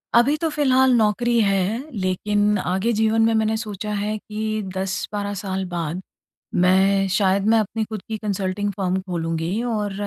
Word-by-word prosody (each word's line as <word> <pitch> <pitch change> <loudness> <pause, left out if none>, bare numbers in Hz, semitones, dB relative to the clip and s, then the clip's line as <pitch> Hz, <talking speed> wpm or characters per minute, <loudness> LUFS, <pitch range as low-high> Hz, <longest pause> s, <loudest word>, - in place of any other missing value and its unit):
अभी 245 +5 +5
तो 325 - +1
फिलहाल 265 -3 +3
नौकरी 235 +2 +2
है, 205 +7 0
लेकिन 205 +2 +1
आगे 190 +4 0
जीवन 220 +1 +2
में 225 0 +3
मैंने 220 0 +1
सोचा 210 -1 -5
है 210 +1 -2
कि 215 +1 -3
10-12 200 +2 -3
साल 190 -1 -3
बाद 170 0 -3 0.6
मैं 195 +2 +4
शायद 195 -1 +2
मैं 225 - +5
अपनी 220 +1 -2
खुद 215 -2 -7
की 220 - -2
कंसल्टिंग 200 0 -2
फर्म 190 -1 -1
खोलूँगी 170 +2 -2
और 210 -4 -2
205 Hz, 155 wpm, -22 LUFS, 190-220 Hz, 0.6 s, अभी